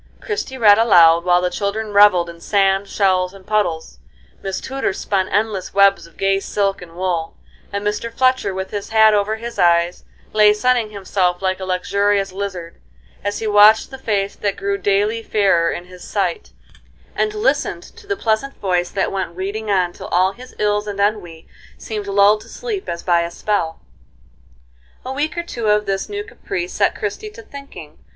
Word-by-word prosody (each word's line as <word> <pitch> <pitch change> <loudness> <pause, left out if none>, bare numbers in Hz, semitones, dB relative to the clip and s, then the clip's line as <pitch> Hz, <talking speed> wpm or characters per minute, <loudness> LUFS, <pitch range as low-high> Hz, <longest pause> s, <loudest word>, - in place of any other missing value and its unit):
Christie 410 - -4
read 210 -3 +6
aloud, 170 -6 +6
while 180 0 +3
the 180 - 0
children 205 +3 -3
revelled 200 -4 +5
in 170 0 -11
sand, 195 0 +1
shells, 185 -2 +1
and 190 -1 -15
puddles; 165 - -1 0.4
Miss 195 -1 -3
Tudor 270 -6 -3
spun 190 -1 -1
endless 205 -3 -1
webs 200 -3 +4
of 170 - -23
gay 195 0 +1
silk 195 -1 -1
and 170 -2 -12
wool; 175 -3 -2 0.3
and 200 0 -4
Mr. 210 +3 -2
Fletcher, 255 -3 +1
with 190 0 -5
his 205 -1 -5
hat 220 -1 +5
over 210 +1 +1
his 235 +2 -7
eyes, 170 0 +2 0.3
lay 210 -1 +6
sunning 240 0 +1
himself 190 -3 -1
like 185 0 0
a 190 - -5
luxurious 200 +2 0
lizard, 185 -3 -6 0.4
as 205 +1 -2
he 225 - -5
watched 210 +2 +5
the 265 - -9
face 205 -5 -1
that 200 -1 -2
grew 200 0 -1
daily 205 +4 +1
fairer 195 -7 +2
in 175 - -5
his 180 0 -13
sight, 190 -5 -2 0.6
and 425 0 -1
listened 425 +3 0
to 455 -3 -16
the 400 0 -2
pleasant 230 +3 -1
voice 180 -2 -1
that 195 - -1
went 190 -3 -4
reading 205 +4 -4
on 180 -3 +1
till - - -9
all 185 +2 +2
his 250 +5 -14
ills 210 0 0
and 200 -1 -5
ennui 200 -6 -2 0.3
seemed 210 -2 -6
lulled 200 +2 +4
to 225 - -15
sleep 430 - -5
as 170 - -5
by 175 -2 +3
a 170 - -3
spell. 170 -3 -2 1.2
A 260 - -4
week 300 +4 -2
or 340 - -1
two 235 -9 -4
of 210 0 +2
this 195 0 -2
new 410 0 -4
caprice 370 -3 -5
set - - +1
Christie 430 - -4
to 440 +2 -13
thinking. 275 - -12
200 Hz, 185 wpm, -19 LUFS, 185-220 Hz, 1.2 s, read